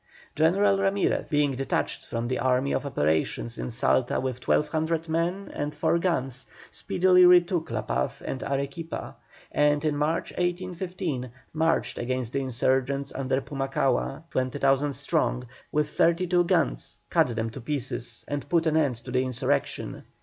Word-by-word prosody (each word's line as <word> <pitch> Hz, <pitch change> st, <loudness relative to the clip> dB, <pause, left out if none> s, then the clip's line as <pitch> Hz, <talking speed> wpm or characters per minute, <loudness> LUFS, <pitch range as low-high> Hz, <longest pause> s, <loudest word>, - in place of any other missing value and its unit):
General 195 Hz, +5 st, +3 dB
Ramirez, 195 Hz, 0 st, +1 dB
being 145 Hz, -2 st, +2 dB
detached 135 Hz, +1 st, -2 dB
from 115 Hz, +1 st, -3 dB
the 130 Hz, +1 st, -1 dB
army 130 Hz, +1 st, +2 dB
of 145 Hz, -, -1 dB
operations 80 Hz, -, 0 dB
in -, -, -3 dB
Salta 120 Hz, +1 st, +1 dB
with 130 Hz, -1 st, -4 dB
1,200 160 Hz, +2 st, +1 dB
men 170 Hz, +5 st, -1 dB
and 145 Hz, +1 st, -3 dB
four 170 Hz, -, +2 dB
guns, 135 Hz, -8 st, -1 dB, 0.2 s
speedily 180 Hz, 0 st, +4 dB
retook 175 Hz, -1 st, +5 dB
La -, -, -2 dB
Paz 65 Hz, +1 st, -2 dB
and 130 Hz, -, -4 dB
Arequipa, 140 Hz, +4 st, -4 dB, 0.4 s
and 150 Hz, +1 st, +2 dB
in 150 Hz, -1 st, +1 dB
March, 150 Hz, +3 st, 0 dB
1815, 175 Hz, -6 st, -3 dB, 0.2 s
marched 160 Hz, +1 st, +1 dB
against 125 Hz, -1 st, -2 dB
the 140 Hz, -, 0 dB
insurgents 130 Hz, +2 st, 0 dB
under 130 Hz, -1 st, 0 dB
Pumacahua, 135 Hz, +1 st, -1 dB
20,000 135 Hz, +2 st, +1 dB
strong 140 Hz, -2 st, 0 dB, 0.3 s
with 150 Hz, 0 st, +1 dB
thirty 170 Hz, +3 st, +2 dB
seven 175 Hz, -1 st, +3 dB
guns, -, -, 0 dB
cut 165 Hz, -4 st, +4 dB
them 115 Hz, 0 st, -2 dB
to 130 Hz, -, -8 dB
pieces, 120 Hz, -3 st, -4 dB
and 145 Hz, -1 st, -4 dB
put 170 Hz, -1 st, +2 dB
an 160 Hz, -1 st, +2 dB
end 145 Hz, -6 st, +2 dB
to 120 Hz, +2 st, -10 dB
the 130 Hz, +1 st, +2 dB
insurrection. 130 Hz, -2 st, -2 dB
145 Hz, 150 wpm, -27 LUFS, 130-165 Hz, 0.4 s, retook